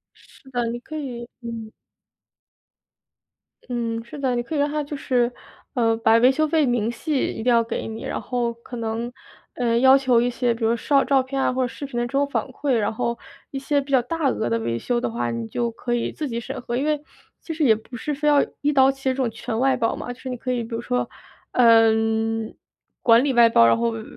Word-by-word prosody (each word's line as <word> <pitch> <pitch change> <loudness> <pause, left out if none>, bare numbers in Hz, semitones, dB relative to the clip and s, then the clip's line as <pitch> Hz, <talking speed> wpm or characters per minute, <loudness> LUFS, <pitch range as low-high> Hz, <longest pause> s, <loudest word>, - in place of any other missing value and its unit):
是 265 - -20
的， 245 -2 -1
你 240 +1 -4
可 310 - -10
以 245 -5 -6
嗯。 230 -2 -7 2.0
嗯， 230 -2 -2
是 240 +5 -10
的， 260 -3 0
你 240 - -1
可 310 - -5
以 - - 0
让 290 - +2
他 300 0 -1
就 290 0 -6
是， 245 -2 +1 0.4
呃， 230 -3 +2
把 225 0 +4
维 250 +2 +6
修 310 +4 +1
费 315 -1 +2
明 240 -2 0
细 280 +4 -1
一 - - -6
定 - - -10
要 230 - +4
给 230 0 -4
你， 225 0 -7
然 - - -3
后 245 -2 -1
可 235 +1 -10
能， 230 +1 -3 0.4
呃， 235 -2 +1
要 265 +1 +7
求 255 -3 +3
一 245 +1 +2
些 245 -1 0
比 230 0 -3
如 230 +1 +3
绍 275 +3 +2
照 270 -1 +3
片 270 +1 -3
啊 255 - +1
或 260 - -1
者 250 - 0
视 280 +4 -7
频 245 -3 -6
的 240 - 0
这 240 - -7
种 280 +1 +1
反 - - -1
馈。 270 +1 -2
然 215 -3 +1
后 235 0 -2 0.3
一 270 - -4
些 285 +1 +1
比 280 - -7
较 260 - +5
大 290 +3 -1
额 120 - -1
的 115 0 +1
维 115 +1 -2
修 240 - -1
的 - - -2
话， 120 +1 -2
你 115 -1 -4
就 235 - -2
可 240 +1 -4
以 235 - -1
自 305 - -4
己 235 -3 -3
审 265 +2 -6
核。 240 - -4
因 260 - 0
为 300 -1 0 0.4
其 325 - -6
实 315 - -1
也 230 -6 +6
不 220 +3 -8
是 295 +5 -3
非 300 +2 -2
要 290 -1 +5 0.2
一 295 +1 +1
刀 265 0 +5
切 270 -1 -2
这 - - -3
种 255 -4 0
全 220 0 -4
外 265 +2 +2
包 230 -2 0
嘛， 245 - -6
就 245 - -10
是 - - -9
你 250 - -3
可 255 +1 -4
以 245 -1 0
比 230 0 -5
如 230 - -3
说， 250 +1 -1 0.4
呃， 225 -2 +6 1.1
管 230 +1 +5
理 285 - +1
外 235 -2 +6
包， 115 - +5
然 115 0 +4
后 115 0 +1
维 115 -1 -6
245 Hz, 265 characters per minute, -23 LUFS, 230-270 Hz, 2.0 s, 要